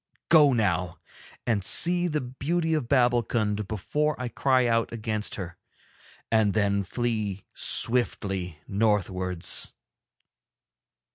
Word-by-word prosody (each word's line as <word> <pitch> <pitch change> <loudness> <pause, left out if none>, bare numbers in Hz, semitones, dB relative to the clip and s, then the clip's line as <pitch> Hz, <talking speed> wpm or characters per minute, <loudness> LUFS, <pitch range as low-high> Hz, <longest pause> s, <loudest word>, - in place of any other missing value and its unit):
Go 150 -4 +6
now 95 -7 -1 0.5
and 105 -5 -1
see 175 - +3
the 150 -3 -2
beauty 160 +7 -3
of 150 -7 -2
Babbulkund 120 -5 0
before 150 +9 -2
I 125 -1 -4
cry 130 +2 +1
out 115 -1 0
against 110 -2 -4
her, 85 -4 -8 0.7
and 110 -3 +1
then 100 -1 +1
flee 105 -2 -4
swiftly 95 -8 +3
northwards.' 95 -4 0
110 Hz, 100 wpm, -25 LUFS, 100-130 Hz, 0.7 s, Go